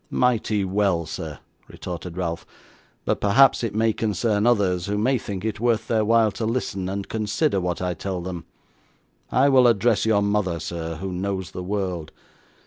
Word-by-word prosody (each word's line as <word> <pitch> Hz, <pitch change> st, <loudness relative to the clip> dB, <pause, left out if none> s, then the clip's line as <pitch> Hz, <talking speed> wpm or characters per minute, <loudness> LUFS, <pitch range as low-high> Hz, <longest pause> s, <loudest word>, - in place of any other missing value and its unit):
'Mighty 110 Hz, -5 st, +1 dB
well, 95 Hz, -3 st, +1 dB
sir,' -, -, -6 dB, 0.3 s
retorted 90 Hz, 0 st, -7 dB
Ralph; 85 Hz, -2 st, -2 dB, 0.6 s
'but -, -, 0 dB
perhaps 120 Hz, +6 st, +5 dB
it 110 Hz, -3 st, -2 dB
may 110 Hz, 0 st, +2 dB
concern 105 Hz, +1 st, 0 dB
others, 95 Hz, -6 st, +2 dB
who 105 Hz, +1 st, -1 dB
may 125 Hz, +4 st, +2 dB
think 100 Hz, -1 st, -5 dB
it 110 Hz, -2 st, -2 dB
worth 115 Hz, -1 st, +1 dB
their 110 Hz, -2 st, +2 dB
while 115 Hz, 0 st, +4 dB
to 110 Hz, -, -4 dB
listen, 100 Hz, -6 st, -2 dB
and 100 Hz, 0 st, -4 dB
consider 110 Hz, -, 0 dB
what 90 Hz, 0 st, -2 dB
I 90 Hz, -1 st, 0 dB
tell 95 Hz, +2 st, -4 dB
them. 90 Hz, -1 st, -6 dB, 0.9 s
I 130 Hz, +2 st, +4 dB
will 130 Hz, -3 st, +6 dB
address 115 Hz, 0 st, +3 dB
your 105 Hz, -2 st, +3 dB
mother, 100 Hz, -4 st, 0 dB
sir, 80 Hz, 0 st, -4 dB
who 95 Hz, +4 st, -5 dB
knows 95 Hz, 0 st, -3 dB
the 90 Hz, -, -6 dB
world. 90 Hz, -4 st, -3 dB
100 Hz, 170 wpm, -23 LUFS, 90-110 Hz, 0.9 s, will